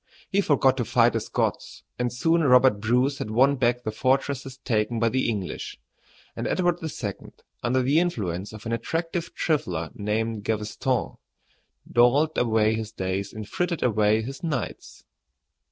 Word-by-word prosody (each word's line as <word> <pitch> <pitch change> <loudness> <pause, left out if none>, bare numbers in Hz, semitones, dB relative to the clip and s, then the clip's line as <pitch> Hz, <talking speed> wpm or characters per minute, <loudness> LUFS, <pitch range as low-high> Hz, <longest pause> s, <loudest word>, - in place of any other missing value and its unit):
He 200 0 +3
forgot 135 -6 +3
to 125 - 0
fight - - +3
the - - +1
Scots, - - -3 0.2
and 125 -1 0
soon 165 +7 +2
Robert 125 -5 +5
Bruce 125 +5 +1
had - - -4
won 130 +6 +4
back 125 -1 +1
the 110 - -2
fortresses 135 +2 -1
taken 115 -3 -1
by 115 0 +3
the 130 +1 0
English, 100 -5 -4 0.6
and - - -3
Edward 175 -1 +1
II., 125 - -5 0.3
under 125 +2 +1
the 140 +5 +3
influence 100 - -2
of 110 +1 -11
an 115 - -3
attractive 165 +8 -2
trifler 90 - -1
named 110 +1 -2
Gaveston, 110 +4 -2 0.7
dawdled 135 +7 +3
away 110 -2 +2
his 110 -1 -4
days 95 +1 -3
and 110 -1 -7
frittered 175 - -2
away 110 -2 +2
his 135 +4 -7
nights. 150 -7 -4
120 Hz, 155 wpm, -25 LUFS, 110-140 Hz, 0.7 s, Robert